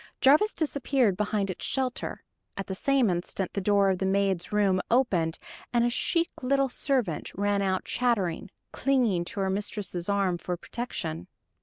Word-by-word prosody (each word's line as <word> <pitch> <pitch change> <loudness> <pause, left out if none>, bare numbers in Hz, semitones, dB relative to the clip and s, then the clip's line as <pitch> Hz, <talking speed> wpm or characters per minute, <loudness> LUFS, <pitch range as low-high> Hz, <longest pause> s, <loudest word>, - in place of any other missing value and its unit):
Jarvis 305 +11 +5
disappeared 275 - +1
behind 205 0 -1
its - - -8
shelter. 260 -2 -2 0.3
At 195 - -3
the 190 - -4
same 270 +4 +2
instant 180 +1 -2
the 200 - -1
door 200 0 +3
of 185 - -2
the 190 - 0
maid's 195 -2 0
room 200 -3 +2
opened, 185 -10 +2 0.3
and 240 -1 +3
a 240 - +1
chic 340 +3 +1
little 275 +1 +2
servant 245 - 0
ran 205 +1 +1
out 190 -1 0
chattering, 215 -9 0 0.2
clinging 240 -11 +1
to 200 +2 -4
her 190 - +1
mistress' 195 -2 -3
arm 195 -3 +1
for 180 0 -3
protection. 170 - -5
205 Hz, 160 wpm, -27 LUFS, 185-250 Hz, 0.3 s, Jarvis